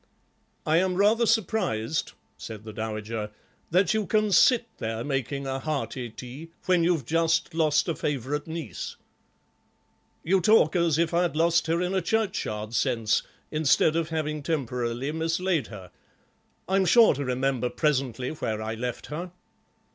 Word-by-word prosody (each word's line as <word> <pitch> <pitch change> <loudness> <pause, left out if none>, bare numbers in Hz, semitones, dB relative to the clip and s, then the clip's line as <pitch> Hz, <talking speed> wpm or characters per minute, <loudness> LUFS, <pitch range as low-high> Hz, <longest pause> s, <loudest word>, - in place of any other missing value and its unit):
"I 155 +1 +3
am 185 +1 +2
rather 215 +4 +3
surprised," 165 - 0 0.2
said 110 -2 -9
the 110 -1 -9
dowager, 110 0 -4 0.4
"that 180 +3 +3
you 215 -3 -1
can 215 +2 +2
sit 240 +5 +5
there 115 +1 -3
making 140 0 -2
a 135 0 -2
hearty 130 -4 -3
tea 130 +8 -9 0.2
when 180 -2 +3
you've 165 -6 +1
just 165 +3 +1
lost 155 -1 +2
a 165 - 0
favourite 150 -1 -2
niece." 160 -2 -6 1.3
"You 190 +3 +2
talk 175 -4 +4
as 170 -3 +2
if 170 0 +1
I'd 175 -2 +1
lost 170 +1 +2
her 165 +1 +1
in 180 +1 -1
a 190 - +1
churchyard 180 - -2
sense, 115 -4 +1 0.3
instead 155 0 +3
of 165 -1 0
having 155 -2 -2
temporarily 125 -3 -2
mislaid 165 -2 0
her. 95 -4 -11 0.8
I'm 190 0 +2
sure 230 +4 +6
to 140 0 -3
remember 130 -1 0
presently 130 -5 -1
where 110 -8 -3
I 110 +1 -3
left 120 +2 -4
her." 175 +3 -5
155 Hz, 145 wpm, -26 LUFS, 125-170 Hz, 1.3 s, sure